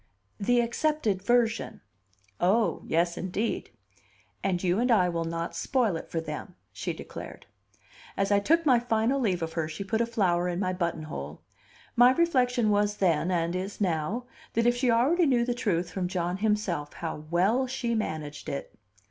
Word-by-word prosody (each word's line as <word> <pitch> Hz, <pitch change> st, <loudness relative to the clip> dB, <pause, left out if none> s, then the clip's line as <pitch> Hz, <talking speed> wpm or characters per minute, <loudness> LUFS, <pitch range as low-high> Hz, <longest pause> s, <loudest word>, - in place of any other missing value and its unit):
"The 240 Hz, +4 st, +3 dB
accepted 235 Hz, -4 st, 0 dB
version." 230 Hz, +1 st, +1 dB, 0.6 s
"Oh, 205 Hz, +6 st, +2 dB
yes, 170 Hz, +1 st, +1 dB
indeed!" 195 Hz, +5 st, -2 dB, 0.7 s
"And 185 Hz, -2 st, 0 dB
you 180 Hz, +2 st, +2 dB
and 250 Hz, +2 st, +1 dB
I 190 Hz, -7 st, +4 dB
will 165 Hz, -1 st, -2 dB
not 165 Hz, 0 st, -3 dB
spoil 235 Hz, -9 st, +1 dB
it 160 Hz, -, -6 dB
for 165 Hz, -, -2 dB
them," 160 Hz, -, -6 dB, 0.2 s
she -, -, -3 dB
declared. -, -, -9 dB, 0.7 s
As 195 Hz, +1 st, +1 dB
I 200 Hz, -, +5 dB
took 330 Hz, +10 st, +2 dB
my 255 Hz, -5 st, +5 dB
final 235 Hz, +3 st, +1 dB
leave 185 Hz, -9 st, 0 dB
of 165 Hz, 0 st, -4 dB
her 160 Hz, -2 st, -1 dB
she 155 Hz, +5 st, -5 dB
put 220 Hz, +4 st, 0 dB
a 235 Hz, -, +1 dB
flower 180 Hz, -6 st, +1 dB
in 175 Hz, 0 st, -2 dB
my 185 Hz, -1 st, 0 dB
buttonhole. 155 Hz, -, -4 dB, 0.5 s
My 245 Hz, +2 st, +7 dB
reflection 250 Hz, -9 st, +2 dB
was 205 Hz, 0 st, +1 dB
then, 170 Hz, -2 st, +2 dB
and 170 Hz, -1 st, 0 dB
is 190 Hz, +2 st, -4 dB
now, 190 Hz, +5 st, -1 dB, 0.3 s
that 230 Hz, +1 st, +1 dB
if 240 Hz, 0 st, +4 dB
she 250 Hz, +1 st, +1 dB
already 290 Hz, +9 st, +3 dB
knew 240 Hz, -3 st, +3 dB
the 245 Hz, -, 0 dB
truth 180 Hz, -8 st, -1 dB
from 180 Hz, +1 st, -2 dB
John 180 Hz, -1 st, -2 dB
himself, 200 Hz, -8 st, -1 dB
how 160 Hz, -2 st, -5 dB
well 205 Hz, +10 st, +2 dB
she 250 Hz, -2 st, -2 dB
managed 155 Hz, -9 st, -3 dB
it! 140 Hz, -, -5 dB
200 Hz, 175 wpm, -28 LUFS, 175-240 Hz, 0.7 s, My